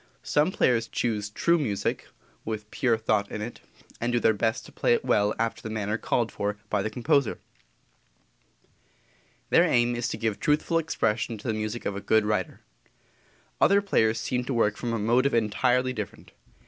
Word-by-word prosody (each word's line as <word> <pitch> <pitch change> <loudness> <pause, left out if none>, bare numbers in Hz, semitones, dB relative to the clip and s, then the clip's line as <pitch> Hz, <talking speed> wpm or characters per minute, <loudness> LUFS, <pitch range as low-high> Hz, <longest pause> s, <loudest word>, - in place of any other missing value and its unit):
Some 150 +5 +2
players 115 -9 +2
choose 105 -4 -2
true 170 +10 +2
music 105 -9 -2 0.4
with 105 -1 -5
pure 120 -6 +1
thought 110 -2 0
in - - -5
it, 115 +3 -6 0.4
and 120 +1 -1
do 120 - +2
their 110 - +3
best 115 +4 -1
to - - -13
play 475 - +2
it 465 - -4
well 105 0 +2
after 115 0 -2
the 110 - -6
manner 105 0 -2
called 120 -2 0
for 105 +1 -3
by 105 - +1
the 110 - -2
composer. 135 +2 +1 2.1
Their - - +6
aim 120 0 +2
is 120 0 -2
to - - -4
give 110 -3 -2
truthful 150 +3 +1
expression 115 -7 -1
to 105 - -9
the 110 - +1
music 110 +2 -4
of 100 - -2
a 100 - -5
good 110 0 +2
writer. 105 -4 -2 1.0
Other 200 - +6
players 115 - +1
seem 125 +3 -1
to 130 - -2
work 105 -2 +2
from 120 - -4
a 115 - 0
motive 120 +5 +2
entirely 125 +4 +1
different. 105 -4 -7
115 Hz, 180 wpm, -26 LUFS, 105-125 Hz, 2.1 s, Their